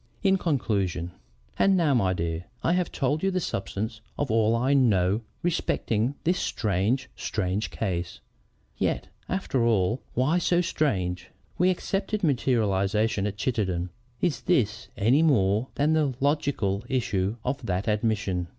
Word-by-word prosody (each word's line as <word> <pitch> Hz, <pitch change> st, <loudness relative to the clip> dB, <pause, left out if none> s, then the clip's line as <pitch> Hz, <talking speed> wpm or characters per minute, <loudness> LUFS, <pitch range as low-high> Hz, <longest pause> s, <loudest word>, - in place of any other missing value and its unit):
IN 195 Hz, -1 st, +4 dB
CONCLUSION 100 Hz, -, -1 dB, 0.5 s
"And 195 Hz, -1 st, +4 dB
now, 160 Hz, -5 st, +3 dB
my 100 Hz, -7 st, +2 dB
dear, 85 Hz, -1 st, -2 dB, 0.2 s
I 165 Hz, -, +3 dB
have 180 Hz, -2 st, 0 dB
told 145 Hz, +3 st, 0 dB
you 195 Hz, -, +2 dB
the 185 Hz, -1 st, 0 dB
substance 110 Hz, -, -4 dB, 0.2 s
of 145 Hz, -4 st, -1 dB
all 110 Hz, 0 st, +3 dB
I 130 Hz, +4 st, +2 dB
know 105 Hz, -6 st, +3 dB, 0.2 s
respecting 135 Hz, -7 st, 0 dB
this 180 Hz, +2 st, +1 dB
strange, 110 Hz, +6 st, 0 dB
strange 95 Hz, +4 st, -2 dB
case. 90 Hz, -5 st, -3 dB, 0.6 s
Yet, -, -, -1 dB, 0.2 s
after 180 Hz, -10 st, 0 dB
all, 115 Hz, +1 st, +2 dB
why 145 Hz, +8 st, +2 dB
so 175 Hz, 0 st, +2 dB
strange? 95 Hz, -, -1 dB, 0.3 s
We 180 Hz, +1 st, +4 dB
accepted 195 Hz, +3 st, -1 dB
materialization 110 Hz, -, +1 dB
at 105 Hz, 0 st, -5 dB
Chittenden. 95 Hz, -7 st, -1 dB, 0.3 s
Is 175 Hz, -4 st, 0 dB
this 120 Hz, -, +1 dB
any 115 Hz, +9 st, +4 dB
more 110 Hz, -6 st, +3 dB
than 150 Hz, +2 st, +2 dB
the 150 Hz, -5 st, +1 dB
logical 140 Hz, -9 st, 0 dB
issue 105 Hz, -6 st, 0 dB
of 130 Hz, +2 st, -2 dB
that 95 Hz, +1 st, -1 dB
admission? 105 Hz, -5 st, 0 dB
115 Hz, 140 wpm, -26 LUFS, 100-145 Hz, 0.6 s, IN